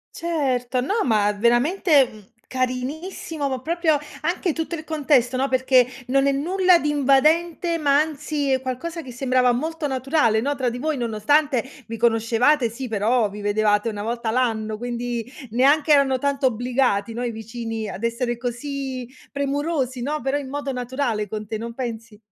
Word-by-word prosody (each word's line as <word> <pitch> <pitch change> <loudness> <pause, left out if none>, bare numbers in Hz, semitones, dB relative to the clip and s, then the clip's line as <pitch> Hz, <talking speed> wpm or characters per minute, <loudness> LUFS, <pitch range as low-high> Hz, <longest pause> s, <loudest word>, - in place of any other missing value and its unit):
Certo. 260 -7 -1
No, 405 - 0
ma 210 -3 +3
veramente, 260 - +3
mhmm, 215 -1 -14 0.3
carinissimo 280 +5 -3
ma 260 -2 -3
proprio, 320 +1 +1 0.2
anche 345 0 0
tutto 325 +1 -3
il 320 - -5
contesto, 280 -6 +2
no, 270 +2 +1
perché 260 -1 +4 0.2
non 270 +2 +2
è 280 - +3
nulla 360 +5 +3
di 300 - -2
invadente, 310 +5 +2
ma 285 -3 +3
anzi 300 -2 -2
è 260 - +2
qualcosa 320 +7 -4
che 260 -4 -9
sembrava 255 0 +2
molto 315 +5 -2
naturale, 265 -4 +1
no, 285 +5 -1
tra 260 -3 -1
di 240 - -5
voi 310 +3 -1
nonostante 245 +3 +1 0.2
vi 230 0 -6
conoscevate, 235 +3 +2
sì, 250 +3 -6
però 220 +1 +1
vi 205 +1 -9
vedevate 210 +1 +2
una 205 -1 -5
volta 230 +1 -2
l'anno. 220 -3 0
Quindi, 240 0 -4 0.2
neanche 285 +6 +4
erano 275 -2 +4
tanto 280 0 0
obbligati, 245 -3 0
no, 235 +2 -4
i 245 - -1
vicini 225 0 -5
ad 195 - -7
essere 235 +1 -1
così 255 +1 -4 0.2
premurosi, 280 -2 -1
no, 295 +5 -2
però 270 +3 0
in 280 -2 -6
modo 285 0 -3
naturale 245 -4 -2
con 215 +1 -5
te, 215 +1 -4
non 230 +1 -6
pensi? 230 -3 -6
255 Hz, 165 wpm, -23 LUFS, 235-290 Hz, 0.3 s, perché